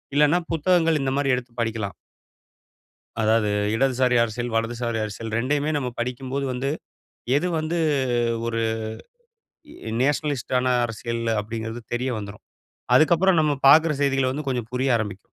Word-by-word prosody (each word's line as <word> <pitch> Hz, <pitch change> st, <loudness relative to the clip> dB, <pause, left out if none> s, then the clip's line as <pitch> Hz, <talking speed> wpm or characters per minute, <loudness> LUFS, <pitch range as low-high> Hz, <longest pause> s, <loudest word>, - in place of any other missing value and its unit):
இல்லனா 150 Hz, +4 st, +4 dB
புத்தகங்கள் 165 Hz, -2 st, +2 dB
இந்த 135 Hz, 0 st, 0 dB
மாதிரி 135 Hz, -2 st, +2 dB
எடுத்து 125 Hz, -1 st, -7 dB
படிக்கலாம். 110 Hz, -3 st, -3 dB, 1.3 s
அதாவது 110 Hz, 0 st, +2 dB, 0.3 s
இடதுசாரி 130 Hz, 0 st, +2 dB
அரசியல், 120 Hz, +1 st, -4 dB
வலதுசாரி 115 Hz, 0 st, -1 dB
அரசியல் 110 Hz, +1 st, -6 dB
ரெண்டையுமே 145 Hz, +5 st, 0 dB
நம்ம 130 Hz, -3 st, -1 dB
படிக்கும்போது 130 Hz, +3 st, -3 dB
வந்து, 135 Hz, +3 st, -2 dB, 0.7 s
எது 170 Hz, +5 st, +1 dB
வந்து 160 Hz, +2 st, -2 dB, 0.7 s
ஒரு 115 Hz, 0 st, -1 dB, 1.3 s
எ -, -, -3 dB
நேஷனலிஸ்ட் 145 Hz, -2 st, -1 dB
ஆன 130 Hz, 0 st, 0 dB, 0.2 s
அரசியல் 115 Hz, +1 st, -4 dB, 0.2 s
அப்படிங்கிறது 110 Hz, +2 st, -5 dB
தெரிய 125 Hz, +2 st, -1 dB
வந்துரும். 100 Hz, 0 st, -9 dB, 0.5 s
அதுக்கப்பறம் 170 Hz, +2 st, +5 dB
நம்ம 150 Hz, -1 st, +2 dB
பாக்குற 155 Hz, +3 st, +7 dB
செய்திகள் 135 Hz, -2 st, +2 dB
வந்து 145 Hz, +2 st, -5 dB
கொஞ்சம் 120 Hz, -3 st, -2 dB
புரிய 130 Hz, +2 st, 0 dB
ஆரம்பிக்கும். 105 Hz, -3 st, -4 dB
125 Hz, 130 wpm, -24 LUFS, 115-145 Hz, 1.3 s, பாக்குற